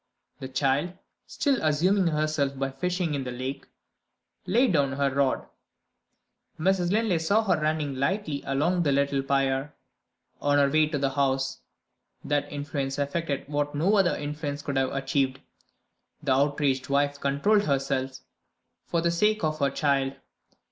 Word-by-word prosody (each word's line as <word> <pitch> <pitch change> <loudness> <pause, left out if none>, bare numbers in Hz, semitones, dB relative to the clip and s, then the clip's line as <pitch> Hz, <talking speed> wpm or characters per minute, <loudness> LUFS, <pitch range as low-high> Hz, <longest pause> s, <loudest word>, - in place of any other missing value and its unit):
The 130 - -5
child 140 +5 0 0.3
(still 275 -4 0
amusing 175 +5 +2
herself 155 -3 0
by 135 0 -2
fishing 180 +3 -2
in 140 -2 -2
the 125 - -5
lake) 130 +3 -5 0.8
laid 235 +2 +3
down 140 -4 +2
her 140 -1 0
rod. 140 -1 +1 1.1
Mrs. 180 +1 +2
Linley 210 -5 +2
saw 200 +7 +2
her 180 -7 +1
running 155 -2 0
lightly 145 +2 -1
along 160 +7 +1
the 150 -4 +2
little 140 0 +1
pier, 135 +1 0 0.7
on 145 0 +2
her 140 -1 +3
way 155 0 +4
to 150 -1 -2
the 135 -1 0
house. 135 -1 0 0.7
That 145 0 -1
influence 145 -2 -3
effected 140 0 -2
what 145 0 -2
no 180 +8 +2
other 195 -3 +3
influence 145 -1 -4
could 140 -2 -2
have 135 -1 +1
achieved. 135 -1 0 0.8
The 140 - 0
outraged 140 -1 +1
wife 145 0 +1
controlled 200 +11 +2
herself, 135 -2 -1 0.7
for 170 - 0
the 170 0 +1
sake 210 +4 +1
of 155 0 0
her 140 -1 +2
child. 140 -1 0
145 Hz, 150 wpm, -27 LUFS, 135-165 Hz, 1.1 s, way